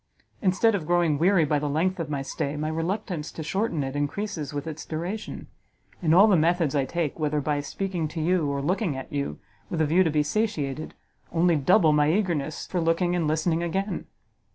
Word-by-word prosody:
Instead 200 +4 +3
of 175 -7 -2
growing 170 -4 +2
weary 175 -1 +4
by 150 0 +1
the 145 0 -2
length 175 +6 0
of 165 -2 -3
my 140 -2 -2
stay, 140 +2 -3
my 155 +1 -2
reluctance 165 0 -3
to 160 - -6
shorten 180 -2 -1
it 135 +1 -4
increases 150 +2 -3
with 145 0 -4
its 160 -1 -6
duration; 175 +7 -5 0.6
and 165 -2 +3
all 195 +4 +8
the 210 -3 +5
methods 165 -2 +2
I 140 -2 +1
take, 165 +1 -2
whether 150 -1 0
by 145 0 0
speaking 170 +3 -3
to 160 +2 -6
you 165 -2 +1
or 140 0 -2
looking 180 - 0
at 135 - -8
you, 140 - -2 0.3
with 170 - -3
a 160 - +3
view 170 +5 +4
to 165 - +1
be 150 -1 +2
satiated, 155 -5 -2 0.4
only 170 0 +3
double 155 +2 +4
my 150 0 +3
eagerness 165 -6 -1
for 180 - -2
looking 165 +2 +1
and 170 -3 0
listening 160 +2 +1
again! 190 +4 -2
160 Hz, 200 wpm, -26 LUFS, 150-180 Hz, 0.6 s, all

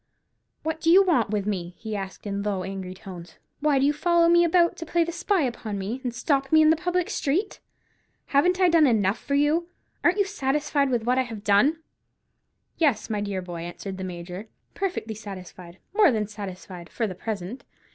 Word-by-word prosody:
"What 320 0 -3
do 325 - +2
you 380 +4 +8
want 260 - +2
with 205 -2 -1
me?" 180 -4 -3
he 220 -2 -5
asked, 195 0 -6
in 200 -1 -2
low 200 -2 -2
angry 190 -1 -6
tones; 180 -3 -11 0.2
"why 295 -1 +2
do 270 - +3
you 290 - +3
follow 340 +2 +3
me 345 0 +6
about 340 0 +3
to 330 - -6
play 340 +1 +2
the 335 - -4
spy 360 +1 +1
upon 230 -5 -3
me, 210 +7 -4
and 250 - -1
stop 270 +2 0
me 315 0 +7
in 310 - +6
the - - +4
public 355 +2 -1
street? 345 +9 -1 0.7
Haven't 360 +7 +2
I 370 - +5
done 330 -3 +5
enough 215 -3 +2
for 280 - -2
you? 300 +4 +2 0.4
Ain't 350 +3 +3
you 405 - +3
satisfied 285 -5 0
with 240 -3 0
what 250 +3 +2
I - - +5
have 225 -5 -6
done?" 255 +11 +3 0.9
"Yes, 280 -11 +1
dear 205 -3 -2
boy," 175 -1 -7
answered 190 +3 -7
the - - -4
Major, 180 +3 -7 0.3
"perfectly 365 - -3
satisfied, 185 -4 -10 0.2
more 410 -3 +6
than 215 -3 0
satisfied—for 195 0 -6
the 195 - -4
present. 205 +4 -5
240 Hz, 195 wpm, -25 LUFS, 195-320 Hz, 0.9 s, you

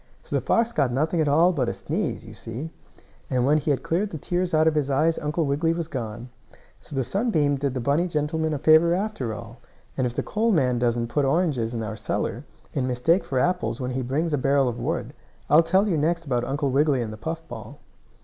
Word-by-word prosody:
So - - -4
the - - +1
fox 230 +1 +1
got 140 -4 +1
nothing 155 +6 +1
at 155 - +1
all 165 +6 +4
but 130 -7 0
a - - -3
sneeze, 160 - -3
you 110 - -10
see, 120 +8 -6 0.6
and 125 -1 +1
when 150 +3 +4
he 150 - -3
had 140 - +1
cleared 190 +6 0
the 160 - -6
tears 175 +4 -1
out 155 0 +3
of 160 - +4
his 150 -2 0
eyes 155 +4 +2
Uncle 150 +2 -1
Wiggily 150 +4 +1
was 165 -1 -3
gone. 120 -4 -5 0.5
So 145 - -10
the 135 - +1
sunbeam 160 - +1
did 135 -1 -2
the 125 - -2
bunny 155 +6 +2
gentleman 160 0 -1
a 150 - -1
favor 160 +4 +5
after 190 - -2
all, 115 +2 -9 0.4
and 130 -2 +1
if 120 - -6
the - - -1
coal 225 +2 0
man 130 - +2
doesn't 120 -1 0
put 145 +4 +1
oranges 135 -6 +1
in 115 - -2
our 110 0 -4
cellar, 105 - -3 0.3
in 130 -2 -1
mistake 130 +9 +2
for 135 - -3
apples 180 -3 0
when 125 -1 -3
he 130 +1 -2
brings 150 +6 -1
a 145 - +1
barrel 135 0 +3
of 120 -1 -3
wood, - - -3 0.4
I'll 150 +2 +8
tell 190 +5 +2
you 170 -6 +1
next 170 +2 0
about 120 -4 0
Uncle 140 +1 -1
Wiggily 140 -2 +2
and 110 -1 -5
the - - -9
puff 160 +8 -5
ball. 120 +3 -9
145 Hz, 235 wpm, -25 LUFS, 125-165 Hz, 0.6 s, I'll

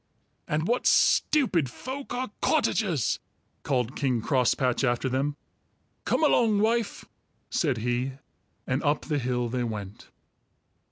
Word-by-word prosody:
"And 155 +3 -1
what 240 +2 +1
stupid 190 - +3
folk 265 - -7
are 250 -2 -3
cottagers!" 190 - +1 0.4
called 125 -2 -1
King 130 -4 0
Crosspatch 125 +1 +1
after 120 0 +1
them. 135 +3 -1 0.7
"Come - - +1
along, 230 -8 +4
wife," 225 0 0 0.5
said 140 -7 +1
he, 120 +3 -1 0.5
and 130 +3 -1
up 145 0 +1
the 150 -2 -1
hill 125 -1 -1
they 125 +1 -2
went. 105 -3 -6
135 Hz, 120 wpm, -27 LUFS, -, 0.7 s, along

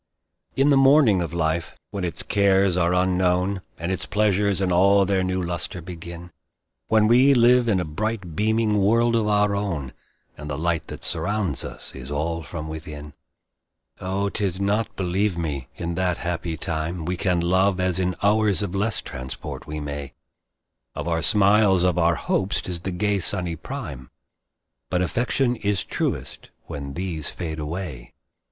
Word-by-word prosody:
In 140 +2 +4
the 140 - +5
morning 135 -8 +5
of 85 - -3
life, 85 -1 -1 0.2
when 100 -2 -4
its 85 - -2
cares 100 -2 +3
are 90 0 +2
unknown, 90 +1 +1 0.2
And 85 +3 -3
its 95 - -3
pleasures 100 -2 +2
in 95 -2 +1
all 100 +3 +5
their 95 -1 +1
new 95 0 -1
lustre 85 +1 -4
begin, 85 0 -9 0.6
When 110 -1 +4
we 130 +4 +6
live 120 0 +5
in 100 -5 +3
a 90 - -1
bright 95 +1 -3
beaming 110 +1 +2
world 115 +4 +3
of 110 -2 +1
our 105 -1 +3
own, 85 -10 -3 0.4
And 75 +1 -8
the 70 - -3
light 85 +1 -1
that - - -8
surrounds 100 - -1
us - - -8
is 65 0 -9
all 80 +3 -2
from 80 0 -6
within; 75 -2 -8 0.9
Oh 95 +2 -1
'tis 95 -3 -2
not, 105 +3 0
believe 95 +1 0
me, 75 -6 -3
in 85 0 -3
that 90 -1 0
happy 85 -2 -3
time 80 +1 -3
We 90 +2 -1
can 90 -1 +1
love, 95 +2 +2
as 90 -1 0
in 90 -1 0
hours 105 -1 +3
of 95 -3 -4
less 100 +1 0
transport 65 +2 -7
we 75 0 -4
may; 70 -2 -6 0.8
Of - - -4
our 85 -1 0
smiles, 100 +1 +4
of 90 -1 +2
our 85 0 +3
hopes, 95 +4 0
'tis 90 -2 -4
the 95 +3 -4
gay 100 +3 0
sunny 90 -2 -2
prime, 80 - -7 0.8
But 90 0 +1
affection 125 +5 0
is 100 -3 0
truest - - -3 0.2
when 70 -1 -6
these 85 -5 -3
fade 80 -3 -5
away. 75 -6 -6
90 Hz, 165 wpm, -24 LUFS, 85-100 Hz, 0.9 s, we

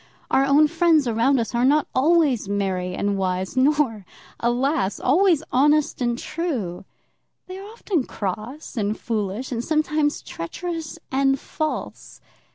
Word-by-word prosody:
Our 270 - +4
own 290 +2 +5
friends 325 -3 +3
around 240 +4 +2
us 230 - -3
are 235 +1 +1
not 290 +3 +4
always 280 - +2
merry 185 -3 -1
and 200 -1 -1
wise, 185 +3 -2
nor, 260 -5 +2 0.4
alas! 240 -2 0
always 325 +2 +3
honest 295 +2 +2
and 240 -1 0
true. 240 - -4 0.6
They 370 +1 -8
are 395 - -9
often 405 - -2
cross 220 - -5
and 210 0 -1
foolish, 220 +2 -3
and 235 -1 -2
sometimes 305 -1 0
treacherous 325 - -5
and 270 0 +2
false. 310 +2 -5
265 Hz, 135 wpm, -23 LUFS, 215-305 Hz, 0.6 s, own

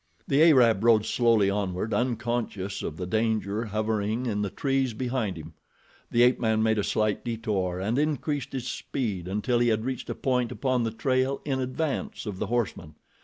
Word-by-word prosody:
The 140 +2 +3
Arab 125 -10 +5
rode 110 -2 +5
slowly 115 -4 +3
onward, 100 +1 -2
unconscious 120 -5 -2
of 80 - -5
the 90 - -4
danger 110 +1 0
hovering 110 +2 -1
in 105 -4 -1
the 100 - -1
trees 135 0 0
behind 120 -6 -2
him. 80 0 -9 0.6
The 120 - +4
ape 125 +1 +4
man 110 -2 +1
made 110 -1 +2
a - - +1
slight 110 0 0
detour 105 -6 -2
and 110 +8 0
increased 150 -2 -1
his 130 -2 -3
speed 105 -10 -3
until 105 +6 0
he 120 - +3
had 110 0 +1
reached 130 -1 -4
a - - -2
point 125 -3 0
upon 130 -2 0
the - - 0
trail 130 +3 0
in 135 -3 -1
advance 130 +2 -3
of 100 -4 -5
the 110 - -2
horseman. 105 -9 -2
115 Hz, 180 wpm, -27 LUFS, 105-125 Hz, 0.6 s, Arab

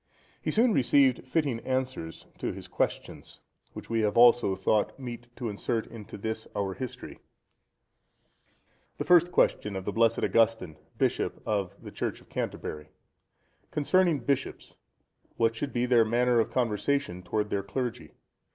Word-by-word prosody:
He - - -2
soon 230 +1 +3
received 130 -2 +3
fitting 140 -4 0
answers 130 -10 -3
to - - -2
his - - -9
questions, - - -3 0.3
which - - -9
we 115 0 0
have 105 -1 +1
also 120 -4 +6
thought 100 +2 +1
meet 120 -2 -7
to 125 - -4
insert 110 +2 -2
in 110 -3 -10
this 110 +2 -4
our 100 -2 -1
history: 130 +4 -7 1.8
The - - -2
First 175 0 +5
Question 105 - +2
of 95 -1 -5
the - - -1
blessed 115 0 +2
Augustine, 110 -8 +2 0.2
Bishop - - 0
of 100 -2 -2
the - - -10
Church - - -3
of - - -22
Canterbury.—Concerning 145 - -3
bishops, 135 +2 -2 0.6
what 115 0 +3
should 135 +4 -3
be 120 0 0
their 120 -2 +5
manner 120 +2 +2
of 110 - +1
conversation 120 -3 0
towards 105 +3 -2
their 100 - 0
clergy? 120 +5 -4
115 Hz, 140 wpm, -28 LUFS, 105-130 Hz, 1.8 s, also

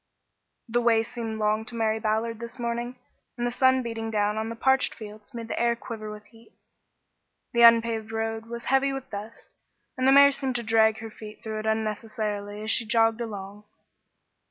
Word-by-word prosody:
The 240 +1 +1
way 230 -1 +4
seemed 225 -1 -5
long 215 0 +1
to 235 - -8
Mary 220 -1 0
Ballard 220 +1 -1
this 235 +1 -7
morning, 240 +1 -3 0.4
and 240 - -1
the 240 - 0
sun 260 +1 +3
beating 225 -1 -4
down 210 -1 +1
on 220 +1 -2
the 230 - -5
parched 265 +3 +2
fields 210 -1 -11
made 230 -1 -7
the - - -3
air 235 0 +2
quiver 225 -2 -7
with 210 0 -9
heat. 225 0 -20 1.0
The 235 - +3
unpaved 230 -1 +5
road 225 0 -3
was 235 0 -6
heavy 270 +1 +2
with 270 -1 -7
dust, 210 +3 -8 0.4
and 255 0 +1
the - - +7
mare 280 +1 +8
seemed 265 -2 -2
to 240 - -1
drag 220 -1 +4
her 225 -1 -7
feet 215 0 -11
through 220 -1 -4
it 215 - -6
unnecessarily 215 -1 -2
as 220 - 0
she 240 - +3
jogged 225 +1 +3
along. 205 -2 -7
225 Hz, 190 wpm, -26 LUFS, 215-235 Hz, 1.0 s, mare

